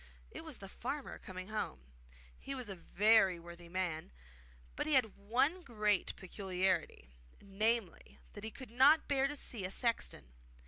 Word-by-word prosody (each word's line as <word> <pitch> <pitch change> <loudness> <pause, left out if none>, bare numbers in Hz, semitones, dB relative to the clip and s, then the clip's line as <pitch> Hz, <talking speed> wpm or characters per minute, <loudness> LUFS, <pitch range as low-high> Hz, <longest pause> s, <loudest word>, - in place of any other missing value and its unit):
It - - -8
was - - -6
the - - -9
farmer - - -5
coming 185 +1 -8
home. 210 - -3 0.6
He 275 - -5
was 250 -5 -5
a 195 - -5
very 195 +1 +4
worthy 170 0 -11
man; 175 - -2 0.6
but - - -2
he 310 - +1
had 225 -6 +3
one 255 - +1
great 210 - 0
peculiarity 185 - -2 0.3
namely, 210 0 0 0.2
that 205 - -9
he 220 - -3
could 255 0 -11
not 275 +6 +6
bear 275 -1 +2
to 290 - -5
see 235 -7 -2
a 185 - -1
sexton. 195 - -1
205 Hz, 155 wpm, -35 LUFS, 185-240 Hz, 0.6 s, not